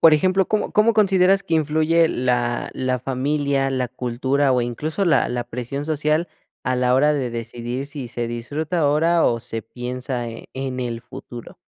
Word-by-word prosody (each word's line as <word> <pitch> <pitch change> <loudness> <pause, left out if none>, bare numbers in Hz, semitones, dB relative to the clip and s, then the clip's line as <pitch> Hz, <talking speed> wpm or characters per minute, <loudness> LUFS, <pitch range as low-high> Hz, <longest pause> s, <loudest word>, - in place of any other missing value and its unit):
por 160 -2 +8
ejemplo, 185 +4 +2
¿cómo 215 - 0
cómo 215 +2 +4
consideras 195 -2 +4
que 165 - -1
influye 160 +2 +3
la 120 -2 0
la 130 -1 -1
familia, 135 +1 0
la 130 -2 -1
cultura 130 +3 0
o 125 - +2
incluso 150 - -2
la 170 - +3
la 120 0 -2
presión 125 +4 -5
social 155 +2 0 0.3
a 130 - 0
la 125 0 +2
hora 150 +3 +4
de 130 -4 -1
decidir 120 +3 -4
si 140 -3 -6
se 120 0 -3
disfruta 145 +9 -3
ahora 160 +3 +3
o 115 -1 +2
se 115 0 -5
piensa 125 +1 -4
e 115 - -9
en 130 -1 -4
el 120 -2 -3
futuro? 120 0 -10
135 Hz, 175 wpm, -22 LUFS, 125-155 Hz, 0.3 s, por